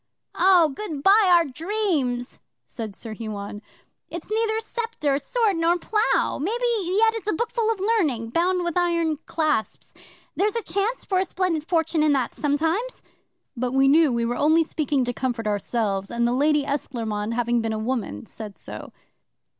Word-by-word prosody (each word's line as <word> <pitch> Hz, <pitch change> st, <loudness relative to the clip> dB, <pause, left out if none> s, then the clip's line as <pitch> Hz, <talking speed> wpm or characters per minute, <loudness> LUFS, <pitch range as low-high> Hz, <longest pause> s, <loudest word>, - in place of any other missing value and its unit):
'"Oh, 360 Hz, -4 st, +5 dB
good 305 Hz, -2 st, -6 dB
bye, 395 Hz, 0 st, +6 dB
our 340 Hz, -1 st, +6 dB
dreams!" 295 Hz, -, -2 dB, 0.3 s
said 220 Hz, -5 st, -7 dB
Sir 225 Hz, +1 st, -7 dB
Huon. 205 Hz, -2 st, -6 dB, 0.5 s
"It's 340 Hz, +4 st, -7 dB
neither 440 Hz, 0 st, +1 dB
sceptre, 450 Hz, -, -2 dB
sword, 440 Hz, 0 st, 0 dB
nor 335 Hz, +1 st, +2 dB
plough! 425 Hz, +5 st, +1 dB
Maybe 450 Hz, -, -1 dB, 0.2 s
yet 440 Hz, +5 st, +3 dB
it's 440 Hz, -2 st, -4 dB
a -, -, +2 dB
bookful 465 Hz, +3 st, -1 dB
of 440 Hz, -, -3 dB
learning, 315 Hz, -, 0 dB
bound 355 Hz, +4 st, +1 dB
with 345 Hz, -2 st, -2 dB
iron 335 Hz, -3 st, +1 dB
clasps. 305 Hz, -8 st, -1 dB, 0.4 s
There's 410 Hz, +3 st, +1 dB
a 465 Hz, -, -1 dB
chance 420 Hz, +5 st, -2 dB
for 375 Hz, -2 st, +1 dB
a 380 Hz, -, +1 dB
splendid 340 Hz, -4 st, -1 dB
fortune 325 Hz, -2 st, +1 dB
in 305 Hz, -1 st, +4 dB
that 265 Hz, -3 st, 0 dB
sometimes." 325 Hz, +12 st, -1 dB, 0.5 s
'But 250 Hz, +1 st, -2 dB
we 270 Hz, 0 st, +4 dB
knew 305 Hz, +1 st, +5 dB
we 235 Hz, -1 st, 0 dB
were 240 Hz, +1 st, -2 dB
only 315 Hz, +3 st, +4 dB
speaking 290 Hz, -4 st, -1 dB
to 245 Hz, -, -2 dB
comfort 245 Hz, -2 st, -3 dB
ourselves, 205 Hz, -1 st, -1 dB
and 235 Hz, 0 st, 0 dB
the 240 Hz, -, +1 dB
Lady 295 Hz, +2 st, +3 dB
Esclairmonde, 230 Hz, -6 st, -3 dB
having 240 Hz, 0 st, +1 dB
been 225 Hz, -, -2 dB
a 220 Hz, -, -2 dB
woman, 220 Hz, -, -3 dB
said 215 Hz, -3 st, -9 dB
so. -, -, -9 dB
310 Hz, 170 wpm, -24 LUFS, 240-385 Hz, 0.5 s, bye